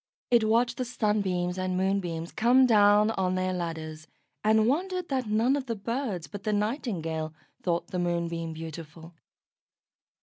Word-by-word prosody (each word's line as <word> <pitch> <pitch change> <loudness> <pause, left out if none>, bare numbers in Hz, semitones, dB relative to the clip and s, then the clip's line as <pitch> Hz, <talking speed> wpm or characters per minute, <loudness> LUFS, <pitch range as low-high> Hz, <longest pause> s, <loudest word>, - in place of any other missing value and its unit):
It 235 -2 +5
watched 235 +2 +2
the 255 - -1
Sunbeams 200 -6 0
and 185 0 -1
Moonbeams 180 -3 -1
come 250 +4 +4
down 210 -2 +5
on 185 -3 0
their 185 0 0
ladders, 160 -3 -5 0.4
and 220 +1 +4
wondered 365 +6 -1
that 260 -4 -1
none 225 +6 +2
of 275 -2 -3
the 230 - -2
birds 220 - -3
but 205 -1 -9
the 215 - 0
Nightingale 180 - -2 0.3
thought 170 -2 -1
the 185 - -3
Moonbeam 170 -1 -1
beautiful. 160 +1 -9
195 Hz, 145 wpm, -28 LUFS, 170-230 Hz, 0.4 s, It